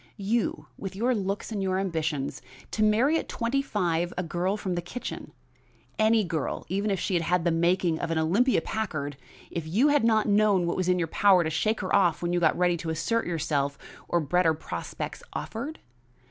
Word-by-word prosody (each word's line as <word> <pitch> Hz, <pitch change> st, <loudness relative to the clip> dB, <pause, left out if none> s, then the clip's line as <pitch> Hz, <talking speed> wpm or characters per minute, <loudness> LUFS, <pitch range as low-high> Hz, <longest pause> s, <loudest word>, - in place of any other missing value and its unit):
You, 215 Hz, +3 st, -1 dB
with 195 Hz, -1 st, -6 dB
your 240 Hz, +5 st, +1 dB
looks 200 Hz, 0 st, -3 dB
and 205 Hz, -2 st, -2 dB
your 190 Hz, -1 st, 0 dB
ambitions, 160 Hz, -7 st, -2 dB, 0.3 s
to 215 Hz, -, -2 dB
marry 235 Hz, +9 st, +4 dB
at -, -, -7 dB
twenty 235 Hz, +4 st, 0 dB
five 175 Hz, -, -1 dB
a 180 Hz, -, 0 dB
girl 180 Hz, +4 st, -1 dB
from 190 Hz, -3 st, -3 dB
the 175 Hz, -, -1 dB
kitchen! 205 Hz, +8 st, -7 dB, 0.7 s
any 220 Hz, 0 st, +4 dB
girl, 165 Hz, -5 st, -3 dB
even 200 Hz, +4 st, 0 dB
if 195 Hz, -2 st, 0 dB
she 185 Hz, -4 st, 0 dB
had 170 Hz, +1 st, 0 dB
the 170 Hz, -, +3 dB
making 170 Hz, 0 st, +2 dB
of -, -, -3 dB
an 165 Hz, -, 0 dB
Olympia 195 Hz, +12 st, +3 dB
Packard, 155 Hz, -10 st, -3 dB, 0.4 s
if 165 Hz, -2 st, -4 dB
you 235 Hz, -, +3 dB
did 290 Hz, -3 st, +3 dB
not 220 Hz, -1 st, +3 dB
know 210 Hz, -1 st, +4 dB
that 170 Hz, -1 st, 0 dB
it -, -, -2 dB
was 185 Hz, -1 st, 0 dB
in 180 Hz, -, +3 dB
your 170 Hz, -2 st, 0 dB
power 190 Hz, +1 st, +4 dB
to 160 Hz, -, -2 dB
shake 215 Hz, +9 st, 0 dB
her 185 Hz, -, 0 dB
off 175 Hz, -5 st, +3 dB
when 175 Hz, 0 st, 0 dB
you 175 Hz, -, +2 dB
got 160 Hz, -2 st, +3 dB
ready 175 Hz, -1 st, +2 dB
to 165 Hz, 0 st, -5 dB
assert 170 Hz, +9 st, 0 dB
yourself, 145 Hz, -4 st, -1 dB, 0.3 s
or 175 Hz, -, +2 dB
better 165 Hz, +1 st, +2 dB
prospects 155 Hz, -, -6 dB
offered? 275 Hz, +8 st, -5 dB
185 Hz, 200 wpm, -27 LUFS, 165-215 Hz, 0.7 s, marry